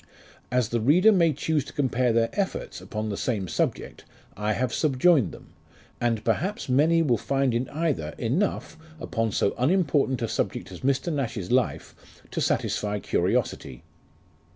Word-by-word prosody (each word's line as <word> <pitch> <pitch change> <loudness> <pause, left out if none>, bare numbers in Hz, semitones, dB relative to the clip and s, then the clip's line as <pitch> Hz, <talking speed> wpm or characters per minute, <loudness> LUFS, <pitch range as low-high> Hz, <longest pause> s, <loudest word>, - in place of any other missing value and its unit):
As 125 -3 +1
the 120 - 0
reader 170 - +5
may 170 -5 +4
choose 150 +1 -1
to - - -11
compare 130 -3 +1
their 115 0 +2
efforts, 200 -2 -3
upon 110 0 -4
the 100 - -2
same 105 -7 -2
subject, - - -2 0.3
I 105 +1 -1
have 120 +2 -1
subjoined 140 - +3
them, - - -13 0.5
and 115 -2 0
perhaps 165 - -1
many 155 +6 +3
will 120 -8 +2
find 135 0 0
in 120 +2 -1
either 140 - -2
enough, 155 - -1 0.2
upon 115 -8 -2
so 100 - +1
unimportant 140 -4 +2
a - - 0
subject - - -3
as - - -9
Mr. 140 +5 0
Nash's 115 -9 -3
life, 125 -1 0 0.4
to - - -2
satisfy 105 0 0
curiosity. 65 -9 -1
130 Hz, 150 wpm, -26 LUFS, 115-155 Hz, 0.5 s, reader